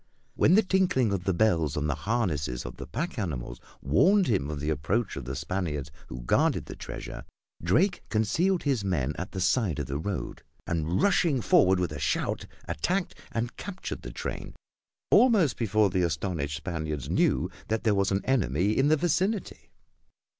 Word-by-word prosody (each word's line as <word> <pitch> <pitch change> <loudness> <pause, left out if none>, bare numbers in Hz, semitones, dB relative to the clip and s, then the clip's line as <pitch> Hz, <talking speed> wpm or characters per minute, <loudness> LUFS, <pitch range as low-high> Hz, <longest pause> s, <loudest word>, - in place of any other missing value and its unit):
When 170 - +4
the 220 - +5
tinkling 185 - +2
of 95 -2 -3
the 95 - +2
bells 85 -8 +2
on 75 - 0
the 75 - +1
harnesses 75 - -1
of - - -7
the - - -7
pack 150 0 -3
animals 65 - -4 0.2
warned 185 - +4
him 85 - 0
of 75 -1 -4
the 75 +2 -1
approach 95 - -1
of - - -6
the 65 +2 -4
Spaniards 75 -2 -3 0.2
who 60 - -7
guarded - - +2
the - - -8
treasure, - - -7 0.4
Drake 175 - +2
concealed 160 - +1
his 135 -7 0
men 75 -8 0
at 95 +4 -5
the 95 - -5
side 95 - +1
of 75 - -2
the 70 +3 -3
road, 95 +3 -4 0.2
and 85 +1 0
rushing 175 -8 +3
forward 95 -2 +4
with 90 -3 -1
a 75 - -6
shout, - - -1 0.2
attacked 185 +1 -1 0.2
and 120 +1 -3
captured 185 -2 -6
the - - -7
train - - -6 0.6
almost 215 - +5
before 110 -3 +2
the 90 - +1
astonished 80 -3 -1
Spaniards 80 -4 -4
knew - - +1 0.2
that 110 0 -1
there 110 -3 +3
was 100 -1 +2
an 95 0 0
enemy 100 - +1
in 135 - +3
the 155 +1 +4
vicinity. 180 +6 -1
95 Hz, 175 wpm, -28 LUFS, -, 0.6 s, the